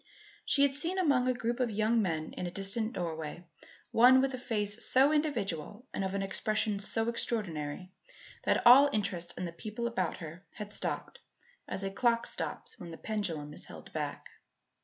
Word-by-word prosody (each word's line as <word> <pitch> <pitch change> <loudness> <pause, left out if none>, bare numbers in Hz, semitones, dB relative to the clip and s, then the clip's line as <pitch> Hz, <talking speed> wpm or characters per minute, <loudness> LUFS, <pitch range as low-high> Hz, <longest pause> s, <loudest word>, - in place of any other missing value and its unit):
She 280 - +3
had 280 -1 +4
seen, 335 +7 -1
among 280 -9 +3
a 255 - +3
group 235 +1 -2
of 250 -2 +1
young 220 +2 +2
men 160 -5 -2
in 180 - -4
a - - -2
distant 200 +5 -2
doorway, 165 -1 -4 0.5
one 250 +3 +7
with 270 0 +1
a - - -3
face 210 -2 0
so 270 +3 +5
individual 230 - -1
and - - -1
of 190 +1 -2
an 195 - 0
expression 215 +1 0
so 225 +3 -1
extraordinary 185 -8 -2 0.5
that - - +1
all 270 +4 +9
interest 185 -6 -2
in 180 - -3
the 170 - -5
people 215 +6 -5
about 185 -8 -1
her 165 +1 -9
had 210 -1 -5
stopped - - -3 0.5
as 195 - -3
a 195 - -2
clock 235 +2 +2
stops - - -4
when 175 - -8
the 165 - -8
pendulum 170 -9 -3
is - - -9
held - - -12
back. - - -4
210 Hz, 180 wpm, -31 LUFS, 180-240 Hz, 0.5 s, all